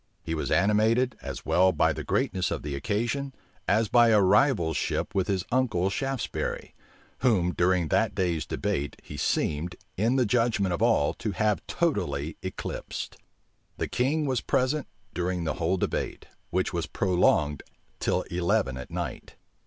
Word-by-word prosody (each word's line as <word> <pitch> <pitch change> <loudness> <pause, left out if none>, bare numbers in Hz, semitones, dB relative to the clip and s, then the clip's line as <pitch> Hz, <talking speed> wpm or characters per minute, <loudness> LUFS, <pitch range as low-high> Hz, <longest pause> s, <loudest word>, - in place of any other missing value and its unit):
He 80 - -3
was 80 - -2
animated, 110 +6 +3
as - - -6
well 95 +1 +4
by 80 - +2
the - - -5
greatness 95 -1 0
of - - -3
the 75 -1 -4
occasion, 120 - -2 0.3
as 110 0 +3
by 120 +2 +5
a 110 -2 +5
rivalship 95 - +2
with 95 -2 +1
his 95 -3 -1
uncle 105 -8 +1
Shaftesbury; 135 +3 -3 0.5
whom, 95 -9 +2
during 90 -2 +2
that - - +2
day's 85 -6 0
debate, 70 +1 -2
he 75 - -9
seemed, 80 +4 -1 0.2
in 115 +6 +2
the 130 -2 +3
judgment 110 -5 +1
of 85 - -3
all, 75 - +3
to 110 -3 -2
have 105 +1 +1
totally - - -1
eclipsed. - - -5 0.6
The - - -1
king 150 +5 0
was 130 -3 0
present 130 +3 0 0.3
during 90 0 -1
the 80 - -1
whole 85 +3 +2
debate, - - -2 0.2
which 90 +2 0
was 85 -2 -2
prolonged 80 -6 +2 0.4
till - - 0
eleven 85 -7 0
at 65 - -8
night. - - -5
95 Hz, 155 wpm, -27 LUFS, 85-120 Hz, 0.6 s, by